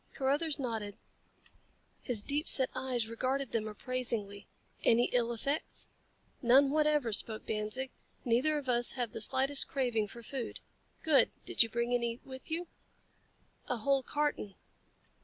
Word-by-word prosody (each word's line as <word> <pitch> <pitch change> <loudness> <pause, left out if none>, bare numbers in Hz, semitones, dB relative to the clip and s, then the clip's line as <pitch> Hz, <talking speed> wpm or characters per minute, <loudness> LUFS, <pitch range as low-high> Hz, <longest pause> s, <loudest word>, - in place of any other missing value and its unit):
Carruthers 285 +3 +1
nodded. 225 -6 -4 1.0
His 230 -6 +1
deep 290 +5 -1
set 260 -2 +4
eyes 255 -3 -2
regarded 260 +3 -2
them 220 -2 -1
appraisingly. 215 -3 -3 0.4
"Any 235 +1 +4
ill 240 -1 +2
effects?" 275 +6 -3 0.5
"None 270 +2 +5
whatever," 300 -6 +2
spoke 215 +2 -1
Danzig. 220 +5 -2 0.3
"Neither 255 +6 +2
of 285 -3 -5
us 240 -1 +2
have 245 -4 -2
the - - -5
slightest 270 +5 +3
craving 245 -7 0
for 235 +3 -11
food." 250 0 -5 0.4
"Good. 310 -3 +5 0.2
Did - - +3
you 230 - +4
bring 235 +2 -1
any 235 -1 0
with 260 -1 -7
you?" 335 +2 -2 1.0
"A 250 - 0
whole 275 +4 +2
carton." 290 -7 -2
250 Hz, 140 wpm, -32 LUFS, 230-275 Hz, 1.0 s, None